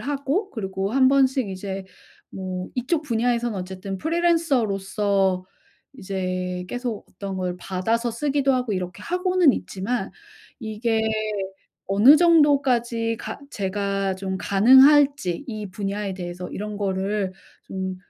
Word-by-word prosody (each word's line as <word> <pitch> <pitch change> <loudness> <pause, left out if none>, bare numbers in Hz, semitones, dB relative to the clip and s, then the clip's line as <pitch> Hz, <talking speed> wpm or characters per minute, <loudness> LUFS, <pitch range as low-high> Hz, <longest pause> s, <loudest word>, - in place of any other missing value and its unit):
하고 285 - -2
그리고 195 -1 -3
한번씩 265 -3 +3
이제 190 0 -5 0.5
뭐 185 -1 -5
이쪽 295 +6 -1
분야에서는 235 -4 0
어쨌든 190 +1 -6
프리랜서로서 210 - +1 0.5
이제 185 -3 -3
계속 245 -4 -4
어떤 195 -1 -6
걸 180 -1 -2
받아서 225 +7 -1
쓰기도 275 +3 +1
하고 250 -4 -1
이렇게 180 -2 -4
하고는 360 -4 +3
있지만 205 +6 -3 0.5
이게 220 0 -1 0.8
어느 215 +10 +7
정도까지 265 -9 +3
가 - - -6
제가 195 -1 -1
좀 190 0 -3
가능할지 265 - +5
이 215 -4 -6
분야에 200 0 -3
대해서 180 -1 -6
이런 210 +1 -5
거를 195 0 -1 0.3
좀 190 -1 -4
210 Hz, 260 characters per minute, -23 LUFS, 190-265 Hz, 0.8 s, 어느